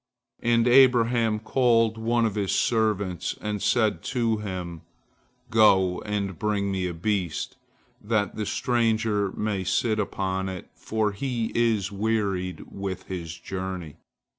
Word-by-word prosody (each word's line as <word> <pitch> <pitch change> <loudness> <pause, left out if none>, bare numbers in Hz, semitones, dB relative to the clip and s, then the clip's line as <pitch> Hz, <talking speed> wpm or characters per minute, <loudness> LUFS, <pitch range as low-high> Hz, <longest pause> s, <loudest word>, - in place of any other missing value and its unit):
And 115 0 +3
Abraham 120 -3 +5
called 115 -1 +2
one 115 +1 +1
of 110 - 0
his 100 -2 -1
servants, 105 -6 0
and 105 -1 -3
said 110 -8 +2
to 115 -3 0
him: 90 -5 -5 0.7
"Go 95 -5 +4
and 100 -4 -2
bring 100 -2 0
me 95 -1 -1
a 90 - -4
beast, 90 -2 -2 0.5
that 105 -1 0
the 105 -2 -3
stranger 110 -4 +1
may 105 -2 -2
sit 110 +4 +1
upon 95 -2 -2
it, 95 -2 -8
for 110 -1 -1
he 115 +1 -2
is 115 -5 +1
wearied 100 -3 -1
with 95 -2 -5
his 85 -3 -5
journey." 95 -5 -6
105 Hz, 130 wpm, -26 LUFS, 95-115 Hz, 0.7 s, Abraham